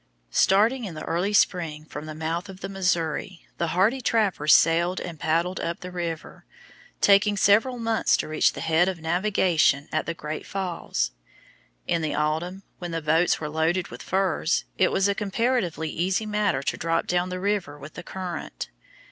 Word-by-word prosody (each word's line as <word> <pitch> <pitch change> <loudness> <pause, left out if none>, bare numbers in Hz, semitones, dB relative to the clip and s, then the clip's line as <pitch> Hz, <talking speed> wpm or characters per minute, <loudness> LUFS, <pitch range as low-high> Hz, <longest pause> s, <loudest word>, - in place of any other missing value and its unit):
Starting 225 +7 +3
in 180 -5 -6
the - - -6
early 180 +5 -1
spring 165 -6 +1
from 150 0 -8
the 155 - -6
mouth 165 +4 -3
of 190 0 -10
the - - -3
Missouri, 180 -1 -1
the 170 - +1
hardy 200 +10 +2
trappers 200 -11 +2
sailed 170 +3 +4
and 165 -4 -7
paddled 170 +4 0
up 170 0 -3
the 180 - -7
river, 170 -3 -5 0.6
taking 205 +1 +5
several 220 +6 +4
months 225 -1 +2
to - - -3
reach 155 0 +2
the - - -7
head 165 +3 +3
of 185 -3 -5
navigation 170 -4 +2
at 155 - -1
the 165 - -2
Great 155 -3 -6
Falls. 180 - -2 0.7
In 170 - 0
the 155 - -1
autumn, 160 +6 -1 0.2
when 175 - -5
the 165 -1 -2
boats 160 +3 +2
were 150 - -4
loaded 160 +4 0
with - - -9
furs, 185 -3 0
it 185 - +3
was 195 - +2
a 200 - +2
comparatively 200 -5 -1
easy 185 +5 0
matter 210 -10 0
to - - -1
drop 165 0 0
down 180 +1 0
the 185 0 -4
river 195 -7 -1
with 145 +1 -11
the - - -7
current. 180 -1 -6
175 Hz, 180 wpm, -25 LUFS, 160-195 Hz, 0.7 s, taking